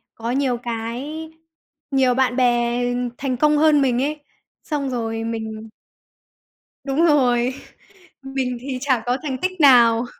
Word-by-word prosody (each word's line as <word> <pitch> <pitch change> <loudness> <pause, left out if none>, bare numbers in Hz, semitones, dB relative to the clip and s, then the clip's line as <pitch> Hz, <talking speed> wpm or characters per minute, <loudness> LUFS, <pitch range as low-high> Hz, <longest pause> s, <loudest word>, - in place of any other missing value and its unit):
có 230 +1 -4
nhiều 260 -2 0
cái 245 +8 -5 0.6
nhiều 260 -2 +3
bạn 260 -1 +1
bè 240 -1 +1 0.4
thành 260 -3 -2
công 300 +1 +3
hơn 300 -2 +4
mình 255 -2 +1
ấy, 295 0 -3 0.4
xong 285 -3 -3
rồi 225 -2 -3
mình 220 -1 -5 1.1
Đúng 285 +5 +1
rồi, 255 -4 +2 0.7
mình 265 -2 -3
thì 265 -1 -4
chả 260 -5 +1
có 245 +2 0
thành 265 -3 -3
tích 370 -1 -2
nào. 240 -3 +6
255 Hz, 135 wpm, -21 LUFS, 240-280 Hz, 1.1 s, nào